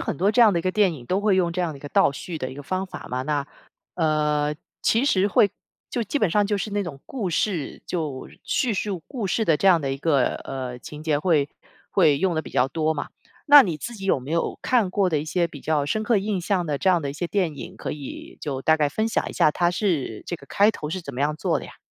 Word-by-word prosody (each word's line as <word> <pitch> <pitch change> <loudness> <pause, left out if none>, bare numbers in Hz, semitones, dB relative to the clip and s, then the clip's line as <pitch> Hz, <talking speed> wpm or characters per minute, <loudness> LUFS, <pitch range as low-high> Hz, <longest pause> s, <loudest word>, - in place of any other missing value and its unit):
很 - - -3
多 195 +7 +2
这 240 - +6
样 220 -3 +6
的 175 - +1
一 - - -3
个 185 - 0
电 200 -3 +3
影 125 -5 -11
都 185 +7 0
会 205 -2 +3
用 175 -2 +2
这 180 +1 -1
样 170 -3 -1
的 140 - -10
一 - - -19
个 145 - -7
倒 - - +4
叙 165 +5 -6
的 130 -4 -4
一 - - -9
个 145 - -8
方 185 +5 -2
法 190 - -9
嘛， 125 +1 -2
那， 145 0 -1 0.5
呃， 150 -2 +1 0.3
其 230 +4 +3
实 200 -7 +3
会 205 +1 +4 0.4
就 240 - -2
基 230 +7 -2
本 210 - +2
上 205 +4 +3
就 205 0 0
是 210 - -3
那 205 0 0
种 150 -7 -7
故 220 -9 -3
事， 170 -3 -1
就 150 -7 -4
叙 245 -4 0
述 195 -2 -2
故 240 -7 -4
事 220 - +1
的 165 -6 +3
这 195 - +3
样 175 -3 +5
的 135 -2 -2
一 - - -3
个， 140 -4 +2
呃， 125 -2 -5
情 150 +3 -9
节 155 -2 +2
会 150 -3 +2 0.4
会 155 -7 +4
用 185 0 +1
得 160 - -1
比 - - -10
较 125 - +2
多 155 +3 0
嘛。 150 - -4 0.4
那 290 -1 +10
你 175 -9 -2
自 235 +9 -6
己 195 -3 -8
有 190 - +2
没 130 +4 -9
有， 165 - -1
看 235 -7 +2
过 195 0 +2
的 160 -4 +1
一 - - -5
些 170 +2 0
比 150 -4 -11
较 150 -1 0
深 215 +9 0
刻 225 +1 +2
印 200 -1 -1
象 180 -1 0
的 150 -2 -1
这 190 +7 +2
样 175 -2 +3
的 145 - -3
一 - - -3
些 160 +5 -3
电 180 -6 0
影， - - -8
可 - - -4
以 145 -3 -8
就 135 -3 -3
大 160 +2 +4
概 150 -2 +2
分 220 +9 -1
享 - - 0
一 - - -8
下， - - +4
它 175 +2 +2
是 170 - -1
这 - - -3
个 - - -15
开 205 +2 +4
头 150 -7 -6
是 185 - -3
怎 140 -6 -8
么 125 - -4
样 150 +2 +1
做 - - 0
的 - - -9
呀？ - - -13
170 Hz, 300 characters per minute, -24 LUFS, 150-200 Hz, 0.5 s, 那